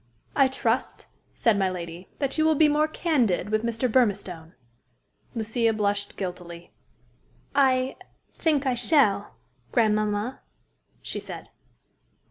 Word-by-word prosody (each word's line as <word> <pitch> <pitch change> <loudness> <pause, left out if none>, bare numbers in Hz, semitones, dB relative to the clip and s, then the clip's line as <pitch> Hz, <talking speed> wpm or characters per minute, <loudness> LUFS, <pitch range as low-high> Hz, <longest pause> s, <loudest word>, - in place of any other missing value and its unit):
"I 275 -2 +5
trust," 255 -2 -1 0.3
said 220 -4 +2
my 190 -1 +2
lady, 175 0 -7
"that 275 -2 -1
you 315 - +2
will 315 0 +4
be 310 +1 +5
more 300 +1 +2
candid 255 - 0
with 215 0 +2
Mr. 235 +2 0
Burmistone." 195 -9 0 0.8
Lucia 225 0 +1
blushed 205 -1 -1
guiltily. 175 -2 -7 0.8
"I 260 -2 +2 0.4
think 300 -4 +1
I 260 - +2
shall, 240 - +2 0.4
grandmamma," 215 +1 +1 0.6
she - - -3
said. - - -9
225 Hz, 115 wpm, -26 LUFS, 200-265 Hz, 0.8 s, I